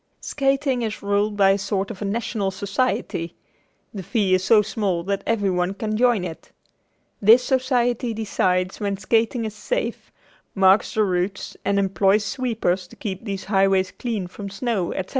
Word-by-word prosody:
Skating 270 Hz, -2 st, 0 dB
is 220 Hz, -3 st, -4 dB
ruled 205 Hz, +1 st, 0 dB
by 195 Hz, -1 st, +5 dB
a 195 Hz, -, +2 dB
sort 200 Hz, 0 st, -2 dB
of 205 Hz, -, -10 dB
a -, -, -2 dB
national 205 Hz, -1 st, -1 dB
society. 195 Hz, -4 st, -2 dB, 0.6 s
The 200 Hz, -, -5 dB
fee 195 Hz, 0 st, 0 dB
is 185 Hz, 0 st, +2 dB
so 215 Hz, 0 st, +5 dB
small 195 Hz, -4 st, -1 dB
that 200 Hz, +2 st, -2 dB
everyone 195 Hz, -4 st, 0 dB
can 215 Hz, +1 st, -3 dB
join 235 Hz, -4 st, +3 dB
it. 165 Hz, -2 st, -9 dB, 0.7 s
This 225 Hz, +5 st, +7 dB
society 250 Hz, -2 st, +1 dB
decides 185 Hz, -4 st, -1 dB
when 200 Hz, -1 st, -2 dB
skating 225 Hz, +4 st, +1 dB
is 215 Hz, -, -4 dB
safe, -, -, -3 dB, 0.4 s
marks 190 Hz, +1 st, +4 dB
the 215 Hz, -, +3 dB
routes 190 Hz, 0 st, -2 dB
and 200 Hz, -, +1 dB
employs 195 Hz, +1 st, +2 dB
sweepers 215 Hz, -6 st, -1 dB
to -, -, -16 dB
keep 195 Hz, -1 st, -6 dB
these 195 Hz, -3 st, -4 dB
highways 195 Hz, -1 st, +2 dB
clear 225 Hz, -7 st, -4 dB
from 200 Hz, +3 st, -8 dB
snow, 200 Hz, -3 st, -2 dB
etc. 190 Hz, 0 st, -4 dB
205 Hz, 160 wpm, -23 LUFS, 190-230 Hz, 0.7 s, This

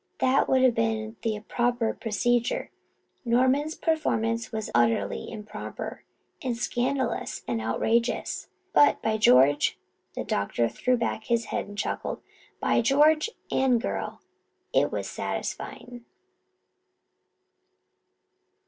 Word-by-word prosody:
That 260 Hz, +1 st, +2 dB
would 260 Hz, -1 st, +4 dB
have 255 Hz, -2 st, +5 dB
been 225 Hz, -1 st, -1 dB
the 220 Hz, -2 st, -2 dB
proper 240 Hz, +1 st, 0 dB
procedure. 240 Hz, +2 st, 0 dB, 0.5 s
Norman's 260 Hz, +6 st, +2 dB
performance 230 Hz, -8 st, 0 dB
was 220 Hz, -2 st, -4 dB
utterly 115 Hz, -4 st, +1 dB
improper 210 Hz, -1 st, -7 dB, 0.4 s
and 245 Hz, -3 st, -2 dB
scandalous 250 Hz, 0 st, -1 dB
and 115 Hz, -2 st, -1 dB
outrageous; 230 Hz, -, 0 dB, 0.3 s
but, 290 Hz, -, +5 dB
by 220 Hz, -1 st, +1 dB
George," 135 Hz, -4 st, +5 dB, 0.4 s
the -, -, -3 dB
doctor 110 Hz, +3 st, 0 dB
threw 250 Hz, -, +1 dB
back 230 Hz, -2 st, -2 dB
his 235 Hz, -1 st, +1 dB
head -, -, -1 dB
and 205 Hz, 0 st, -10 dB
chuckled, -, -, -3 dB, 0.4 s
"by -, -, +2 dB
George, 300 Hz, -, +4 dB, 0.2 s
Anne 260 Hz, -2 st, +3 dB
girl, 230 Hz, -, -4 dB, 0.5 s
it -, -, +3 dB
was -, -, -3 dB
satisfying." 245 Hz, -1 st, -5 dB
230 Hz, 110 wpm, -27 LUFS, 215-255 Hz, 0.5 s, have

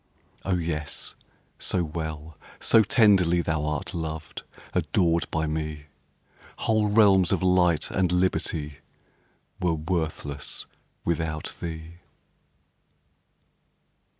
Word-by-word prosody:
Oh, 95 Hz, -, +1 dB
yes, 75 Hz, -3 st, -4 dB, 0.5 s
so 90 Hz, -, 0 dB
well, 80 Hz, -1 st, -5 dB, 0.2 s
so 115 Hz, -, +5 dB
tenderly 95 Hz, -7 st, +4 dB
Thou'rt 75 Hz, +1 st, -2 dB
loved, 80 Hz, -3 st, -5 dB, 0.3 s
adored 85 Hz, -2 st, +1 dB
by 80 Hz, 0 st, 0 dB
me, 75 Hz, -1 st, -3 dB, 0.7 s
Whole 110 Hz, -1 st, +2 dB
realms 100 Hz, -4 st, +5 dB
of 95 Hz, -2 st, +1 dB
light 90 Hz, -3 st, +3 dB
and 90 Hz, -2 st, +1 dB
liberty 85 Hz, -5 st, 0 dB, 0.8 s
Were 90 Hz, -2 st, +1 dB
worthless 80 Hz, -3 st, -3 dB, 0.4 s
without 80 Hz, -2 st, -2 dB
thee. 80 Hz, 0 st, -6 dB
85 Hz, 90 wpm, -26 LUFS, 80-90 Hz, 0.8 s, so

